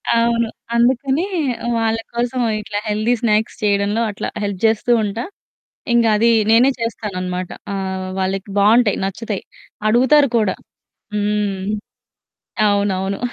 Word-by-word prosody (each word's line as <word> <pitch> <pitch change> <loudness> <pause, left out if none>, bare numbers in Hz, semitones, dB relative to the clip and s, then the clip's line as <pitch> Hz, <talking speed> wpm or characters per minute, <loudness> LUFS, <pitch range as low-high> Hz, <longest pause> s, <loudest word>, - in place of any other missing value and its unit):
అవును. 235 0 +2 0.3
అందుకనె 265 +6 +2 0.5
వాళ్ళ 225 0 +1 0.2
కోసం 245 +1 -1 0.2
ఇట్లా 205 -1 -4
హెల్దీ 215 +3 +1
స్నాక్స్ 215 -1 +1
చేయడంలో 205 +2 +1
అట్లా 200 - -5 0.2
హెల్ప్ 200 -2 -3
జేస్తూ 220 +2 +2
ఉంటా, 210 +3 -3 0.7
ఇంగది 230 0 +4 0.2
నేనే 240 +4 +6
చేస్తాననమాట. 185 -5 -3 0.2
ఆహ్, 190 -1 -3
వాళ్ళకి 190 +1 -2
బావుంటాయి, 215 +1 +4
నచ్చుతాయి, 200 +1 -4 0.5
అడుగుతారు 260 +4 +4
కూడా. 210 -4 +1 0.6
హ్మ్, 205 -1 0 1.1
అవునవును. 195 -1 0
210 Hz, 105 wpm, -19 LUFS, 200-235 Hz, 1.1 s, నేనే